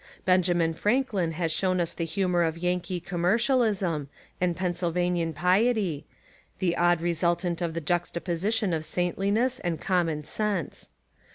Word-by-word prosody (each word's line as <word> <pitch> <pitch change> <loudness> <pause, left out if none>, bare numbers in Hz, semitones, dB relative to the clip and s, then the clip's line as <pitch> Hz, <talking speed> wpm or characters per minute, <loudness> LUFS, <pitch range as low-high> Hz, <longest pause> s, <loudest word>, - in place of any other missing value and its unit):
Benjamin 175 -3 +3
Franklin 205 -4 0
has 165 0 -1
shewn 185 +2 +1
us 170 -1 -1
the 165 - -3
hu 190 +3 -1
mour 175 -1 +2
of 165 -1 0
Yankee 180 +1 -1
commercialism, 190 - +1 0.3
and 175 -1 +1
Pennsyl 175 -1 -1
vanian 175 -1 0
piety 185 0 +1 0.2
— - - -32
the 175 -3 0
odd 175 -1 +3
resultant 170 +1 0
of 165 -2 -2
the 170 - -2
juxtaposi 175 +3 -1
tion 220 -5 +1
of 160 -1 -1
saintliness 200 +10 0
and 170 -3 -2
common 170 -5 0
sense. 200 0 -2
175 Hz, 150 wpm, -27 LUFS, 170-190 Hz, 0.3 s, Benjamin